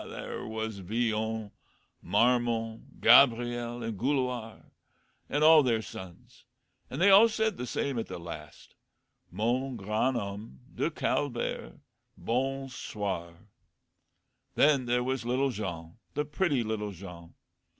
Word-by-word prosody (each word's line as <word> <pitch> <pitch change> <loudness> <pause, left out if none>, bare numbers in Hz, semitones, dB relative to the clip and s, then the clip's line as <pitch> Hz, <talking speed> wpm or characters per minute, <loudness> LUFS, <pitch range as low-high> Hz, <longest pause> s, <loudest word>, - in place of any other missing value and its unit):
There - - -6
was 110 -1 -4
Villon, 110 +1 -2 0.5
Marmon, 115 +2 +1
Gabriel, 120 -1 +4
and 115 -4 -4
Gouloir, 125 -4 -2 0.6
and 145 +1 +1
all 160 0 +8
their 115 -5 +1
sons; 95 -4 -11 0.5
and 135 - -5
they 195 +3 +6
all 210 +4 +8
said 220 -1 0
the 125 - -5
same 135 -1 -2
at 115 - -4
the - - -6
last, 80 -3 -10 0.6
'Mon 125 +4 -1
grand 110 +5 0
homme 100 +2 -6
de - - 0
Calvaire 125 - -2 0.4
bon 135 +3 -1
soir!' 100 -8 -5 1.1
Then 140 -4 +4
there 125 +1 +1
was 130 0 -2
little 130 +3 +1
Jean, 85 -4 -6 0.2
the 150 - 0
pretty 150 -4 0
little 105 -2 -3
Jean. 85 -2 -11
120 Hz, 120 wpm, -29 LUFS, 105-130 Hz, 1.1 s, all